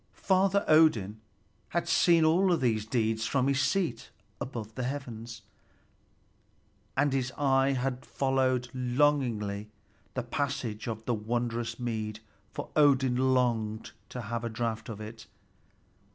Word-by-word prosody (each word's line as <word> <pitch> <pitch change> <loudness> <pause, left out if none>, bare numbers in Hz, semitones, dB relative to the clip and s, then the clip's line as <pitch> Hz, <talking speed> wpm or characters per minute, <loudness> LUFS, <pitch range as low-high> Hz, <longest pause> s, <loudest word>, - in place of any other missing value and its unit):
Father 195 +1 +2
Odin 110 -10 +4 0.5
had - - -1
seen 165 -2 +4
all 175 +2 +4
these 110 -6 0
deeds 110 -1 0
from 135 -1 +1
his 140 0 +2
seat 170 -12 0 0.3
above 115 -4 -6
the 125 - -5
heavens, 120 -4 -5 1.5
and 145 -1 +2
his 130 -1 0
eye 135 -1 +2
had 130 0 -2
followed 130 -2 0
longingly 125 -6 0 0.5
the 130 - -1
passage 120 -4 -3
of 110 -1 -5
the 120 - +1
wondrous 115 +1 -2
mead, 110 -3 -3 0.3
for - - -6
Odin 130 -3 +4
longed 110 -3 0 0.2
to 125 - -5
have 115 +1 -4
a 115 - -2
draught 110 -1 -3
of 110 -2 -6
it. 110 +1 -9
125 Hz, 125 wpm, -29 LUFS, 110-135 Hz, 1.5 s, Odin